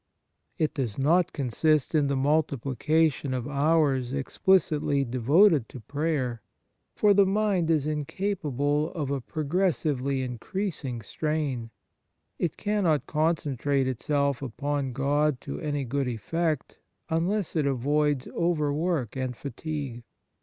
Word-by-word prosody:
It 155 - 0
does 125 -8 -3
not 165 +6 +3
consist 150 +3 +1
in 150 -3 +3
the 140 - 0
multipli 140 -2 0
cation 155 -3 +2
of 125 -2 -3
hours 140 -3 +2
explicitly 145 -1 +2
devoted 135 - +4
to 130 - -9
prayer, 135 -2 -2 0.5
for 210 -1 +5
the 200 0 +6
mind 195 -4 +1
is 155 -4 +2
incapable 150 -2 -1
of 145 -5 -3
a 140 -2 -1
progressively 150 -4 0
increasing 130 - -4
strain; 145 -2 -2 0.7
it 170 -4 -1
cannot 190 - +1
concentrate 145 -4 0
itself 140 +1 0
upon 140 +2 -2
God 140 +1 +1
to - - -6
any 145 -2 -2
good 135 +2 -1
effect 155 +6 -2 0.3
unless 175 +4 -1
it 150 -3 +2
avoids 140 +1 +1
overwork 155 - 0
and 130 -2 -3
fatigue. 140 -2 -5
145 Hz, 120 wpm, -27 LUFS, 135-160 Hz, 0.7 s, the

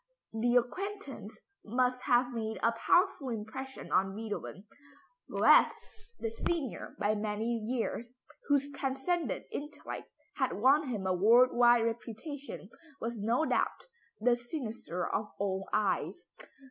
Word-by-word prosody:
The 240 +2 +1
acquaintance 395 - -2 0.2
must 250 +3 +1
have 245 -1 +3
made 220 -1 -3
a 230 - +5
powerful 280 - +2
impression 235 +4 -6
on 190 +1 +2
Beethoven. 210 -2 -5 0.6
Goethe, - - +6 0.4
the 225 - -3
senior 265 - -3
by 210 +1 +1
many 210 +1 -2
years, 235 +1 -3 0.4
whose 285 0 +2
transcendent 280 +5 -1
intellect 295 +1 -6 0.3
had 265 -3 +1
won 275 +7 +4
him 210 -6 -3
a 185 - +2
world 230 +7 +6
wide 240 -1 +6
reputation, 235 +1 -5 0.3
was 230 0 -4
no 235 +9 +2
doubt - - 0 0.3
the 240 +2 +4
cynosure 240 - -4
of 210 0 -2
all 195 -1 -2
eyes. 210 -2 0
240 Hz, 120 wpm, -32 LUFS, 215-265 Hz, 0.6 s, Goethe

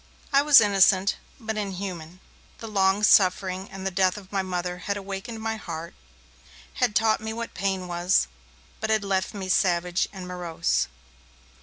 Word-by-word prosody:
I 275 - +6
was 290 -2 +8
innocent, 195 -2 +4 0.2
but 220 -2 -4
inhuman. 185 -4 -5 0.4
The 225 - -8
long 195 -1 +2
suffering 190 -1 +3
and 195 0 -8
the 195 - -1
death 185 +1 +2
of 195 -2 -12
my 195 -1 0
Mother 180 -1 -3
had 200 - 0
awakened 200 +3 -6
my 225 0 -2
heart, 170 -4 -7 0.9
had 210 - +2
taught 220 -1 +3
me 220 0 -4
what 235 +1 -6
pain 190 -2 -2
was, 175 - +2 0.5
but 220 - -3
had 220 -1 +2
left 195 +1 -1
me 195 -2 -5
savage 180 -1 +1
and 190 -2 -8
morose. 175 -2 -1
195 Hz, 160 wpm, -25 LUFS, 180-210 Hz, 0.9 s, was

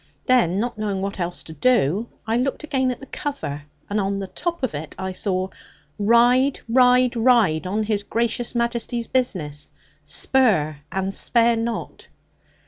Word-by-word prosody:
Then, 230 -8 +3
not 235 0 -3
knowing 200 -3 -2
what 195 0 -4
else 175 0 -3
to 160 - -10
do, 210 - +2 0.2
I 225 +1 0
looked 260 +5 -1
again 265 -4 0
at 250 - -3
the 275 - -10
cover, 270 - -5 0.2
and 205 +1 0
on 195 0 -1
the 195 - -3
top 340 - -4
of 255 - 0
it 150 +1 -6
I 190 0 -3
saw, 185 0 -2 0.5
'Ride, 245 +5 +4
Ride, 250 +1 +4
Ride! 225 -9 +3
On 210 +4 0
His 210 -1 0
Gracious 235 +3 -1
Majesty's 235 0 -1
business; 165 - -2 0.3
spur 155 - +2
and 190 0 -2
spare 235 +2 +3
not.' 230 0 -4
225 Hz, 155 wpm, -22 LUFS, 190-250 Hz, 0.5 s, Ride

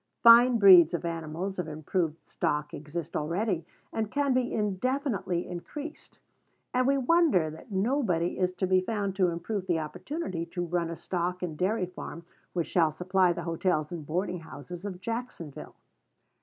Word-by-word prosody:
Fine 235 +1 +8
breeds 180 -6 +8
of 170 - -4
animals 170 +3 -4
of 175 - -2
improved 155 +1 -2
stock 150 0 -1
exist 160 +2 -6
already, 170 +2 -1 0.3
and 220 -2 -1
can 285 0 +1
be 250 -1 +1
indefinitely 210 - -1
increased; 290 - -8 0.6
and 255 0 +2
we 275 0 +3
wonder 265 - +3
that 160 +8 -12
nobody 195 - 0
is 185 -1 +2
to 190 - -1
be 185 0 +3
found 200 -1 -2
to 185 -2 +4
improve 180 +3 -3
the 175 - +2
opportunity 180 - -4
to 175 0 -3
run 170 -1 -1
a 170 - -4
stock 180 +2 -3
and 165 -4 -3
dairy 190 +4 0
farm 170 -1 -8 0.3
which 170 -2 0
shall 165 -3 +3
supply 180 +3 +2
the 170 0 -4
hotels 165 -2 0
and 160 -4 -6
boarding 180 +2 -1
houses 170 +3 -9
of 185 -3 -5
Jacksonville. 225 - -6
180 Hz, 160 wpm, -29 LUFS, 170-215 Hz, 0.6 s, Fine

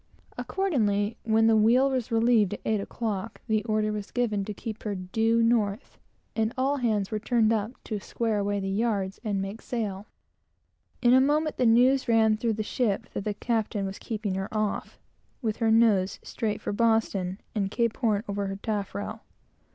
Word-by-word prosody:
Accordingly, 225 - 0
when 225 0 +3
the 225 0 +5
wheel 240 +5 +4
was 255 -4 -2
relieved 225 -3 +3
at - - -13
eight 215 -2 +1
o'clock, 215 0 -4
the 215 -2 +1
order 215 -1 +1
was 210 -1 -5
given 220 -5 0
to 210 - -4
keep 215 +1 -6
her 210 -2 -3
due 225 +5 +1
north, 225 -1 0 0.4
and 225 +1 0
all 275 +2 +1
hands 215 -6 0
were 215 - -1
turned 230 0 +2
up 220 +2 -1
to 215 -2 -4
square 220 +1 -1
away 205 0 0
the 195 - -3
yards 200 -1 -1
and 205 -3 -1
make 195 +3 -5
sail. 210 -4 -4 1.0
In 240 0 +6
a 260 - +7
moment, 300 +3 +1
the 250 - +3
news 255 +4 +4
ran 220 -2 +4
through 225 +1 0
the 215 0 -2
ship 210 -2 -1
that 200 - -4
the 210 -1 -1
captain 220 -2 -1
was 195 0 -6
keeping 215 -3 -3
her 190 +1 -3
off, 215 -1 -2 0.4
with 220 -5 -2
her 225 -2 +1
nose 220 -4 +3
straight 215 -2 -3
for - - -3
Boston, 205 -4 +1
and 200 -3 -1
Cape 230 +1 0
Horn 215 -4 +1
over 200 0 -2
her 195 - -3
taffrail. 205 0 -4
220 Hz, 180 wpm, -27 LUFS, 205-230 Hz, 1.0 s, a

